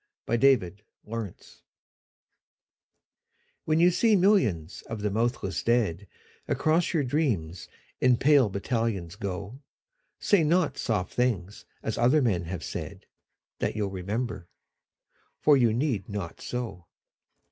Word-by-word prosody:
XCI 115 - +1 0.2
The 90 +2 -10 0.3
Army 115 -2 -2
of - - -19
Death - - -20 2.0
WHEN 155 +1 +2
you 175 +1 +6
see 220 +4 +3
millions 145 - +2
of 115 -2 -5
the 105 - 0
mouthless 115 -2 -1
dead 105 -6 0 0.4
Across 165 +3 +1
your 150 - +2
dreams 110 - -1 0.3
in 125 -1 +4
pale 140 -4 +4
battalions 100 -4 -2
go, 100 +6 -6 0.6
Say 200 -5 +3
not 165 +1 +1
soft 105 -6 -1
things 105 -6 -1 0.2
as - - -3
other 135 +5 +4
men 95 -8 0
have 85 0 -5
said, - - -6 0.5
That - - -1
you'll 105 -2 -2
remember. 100 0 -4 0.9
For 150 - +5
you 120 -4 +4
need 120 -4 -1
not 100 -5 -6
so. 110 -8 -5
115 Hz, 125 wpm, -27 LUFS, 95-135 Hz, 2.0 s, you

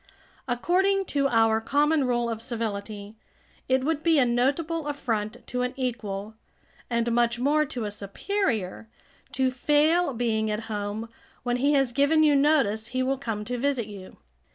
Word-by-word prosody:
According 380 +10 +1
to 280 -1 +2
our 225 -3 +3
common 290 +4 +2
rule 240 -1 0
of 225 -1 -4
civility, 215 -2 -5 0.5
it 260 0 +2
would 310 +1 0
be 325 -1 +3
a 265 - +5
notable 290 +7 0
affront 225 -7 -3
to 250 - -3
an 250 +1 -2
equal, 220 -5 -3 0.6
and 235 0 0
much 240 0 +2
more 295 +5 +2
to 245 -5 -5
a 205 - -3
superior, 220 - -2 0.4
to 260 -1 +1
fail 300 +4 +2
being 220 -2 0
at 210 +1 -2
home 215 0 -4 0.4
when 245 0 0
he 280 +4 +2
has 270 -3 +2
given 285 +5 +3
you 295 -2 +5
notice 275 -7 +2
he 255 +2 -1
will 270 +1 -1
come 220 -5 -4
to 245 +1 -3
visit 270 -3 0
you. 200 -3 -11
245 Hz, 160 wpm, -26 LUFS, 220-285 Hz, 0.6 s, a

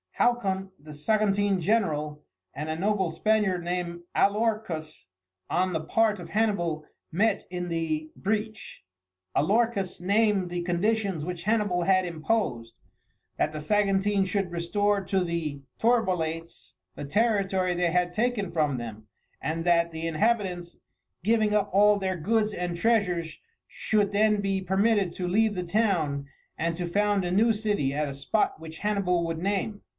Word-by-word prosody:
Halcon, 195 -6 0
the 150 +1 -11
Saguntine 205 +4 +1
general, 155 -7 0 0.3
and 150 +2 -5
a 155 - -1
noble 195 +1 0
Spaniard 190 +1 +1
named 175 -1 -3
Alorcus, 200 - 0 0.4
on 185 +1 +1
the 160 - 0
part 210 +5 +1
of 170 -1 -9
Hannibal, 175 -7 0 0.3
met 210 +7 +1
in 180 -1 -4
the 155 -2 -2
breach. 215 +2 -3 0.5
Alorcus 200 +2 +1
named 200 0 +2
the 175 0 -2
conditions 185 -1 0
which 175 -1 -5
Hannibal 205 -5 +1
had 185 0 +3
imposed 160 - -2 0.6
that 155 - +1
the 155 0 -5
Saguntines 200 +2 +2
should 195 -3 -1
restore 200 +4 0
to 190 -2 +1
the 165 -5 -3 0.2
Torbolates 180 -8 0 0.2
the - - -6
territory 195 0 +1
they 175 0 +1
had 175 0 +1
taken 220 -3 0
from 150 -5 +1
them, 110 -2 -7 0.3
and 165 +3 -3
that 170 -1 +3
the 160 0 -4
inhabitants, 180 -1 0 0.5
giving 215 0 +2
up 205 -1 +2
all 205 +1 +5
their 190 -1 -1
goods 215 +5 +1
and 175 -2 -3
treasures, 180 -6 +1 0.3
should 205 -2 0
then 210 +1 +3
be 195 -1 0
permitted 195 0 +2
to 180 - -3
leave 215 +3 +2
the 180 - -2
town 170 -8 0 0.3
and 165 +1 0
to 175 -1 -3
found 205 +1 +1
a 175 - -2
new 220 +5 +4
city 210 -10 0
at 150 +1 -1
a - - -5
spot 140 +8 0
which 160 0 -10
Hannibal 195 -5 +1
would 165 -1 -3
name. 200 +3 -2
185 Hz, 150 wpm, -27 LUFS, 165-210 Hz, 0.6 s, all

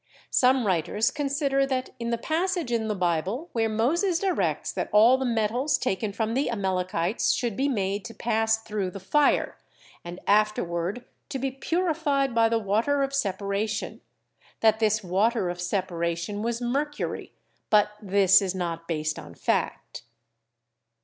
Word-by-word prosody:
Some 255 -1 +3
writers 195 +4 +1
consider 280 -1 0
that 260 -1 -2
in 235 0 -3
the 235 - 0
passage 335 +1 -1
in 225 -2 0
the 210 - -1
Bible 185 - -1
where 225 -1 0
Moses 325 - +1
directs 375 0 -1
that - - -3
all 225 +5 +6
the 265 0 -2
metals 240 +5 +1
taken 210 -3 -2
from 220 +2 -2
the 270 +2 0
Amalekites 185 -3 0
should 235 -5 -2
be 275 +5 +1
made 200 -6 -1
to 230 - -8
pass 225 -1 +1
through 210 -4 -2
the 195 - -8
fire 285 +10 +1 0.4
and 175 +1 -8
afterward 205 0 +1 0.2
to 270 - -3
be 265 +1 -2
"purified 295 -3 0
by 230 -1 +4
the 230 - +2
water 225 +7 +1
of 275 - -1
separa 200 -4 -1
tion," 210 +1 -5 0.6
that 220 -1 +4
this 215 -1 +2
"water 190 +1 +1
of 175 0 -7
separation" 175 +1 -2
was 235 +1 -2
mercury, 285 +5 -3 0.4
but 210 0 +4
this 195 -1 +5
is 190 -1 -2
not 170 -2 -4
based 155 -2 -2
on - - -11
fact. - - -2
220 Hz, 155 wpm, -26 LUFS, 195-265 Hz, 0.6 s, all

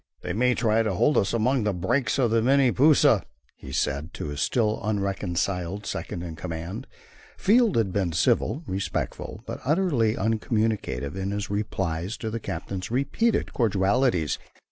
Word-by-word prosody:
"They - - -3
may 125 +3 +2
try 115 -1 +2
to 110 -4 -1
hold 150 +11 +3
us 95 - +2
among 125 +3 +1
the 105 -2 0
breaks 95 +12 0
of 125 -4 +2
the 115 0 +3
Mini 135 +1 +4
Pusa," 145 +4 +5 0.5
said 70 +1 0
he, - - -12
to - - -5
his 75 0 -4
still 110 -3 +1
unreconciled 100 -2 -2
second 85 - -4
in 85 -2 -6
command. 85 +2 -6 0.5
Field 225 +1 +4
had 105 -5 +1
been 95 -4 0
civil, 130 - +1
respectful, 95 +1 -4
but - - -6
utterly 140 - +1
uncommunicative 110 - -1
in 95 0 -3
his 100 0 -3
replies 95 -2 -2
to 110 - -4
the 115 - -3
captain's 95 -3 -5
repeated 140 - 0
cordialities. 100 - +1
105 Hz, 155 wpm, -26 LUFS, 95-125 Hz, 0.5 s, Pusa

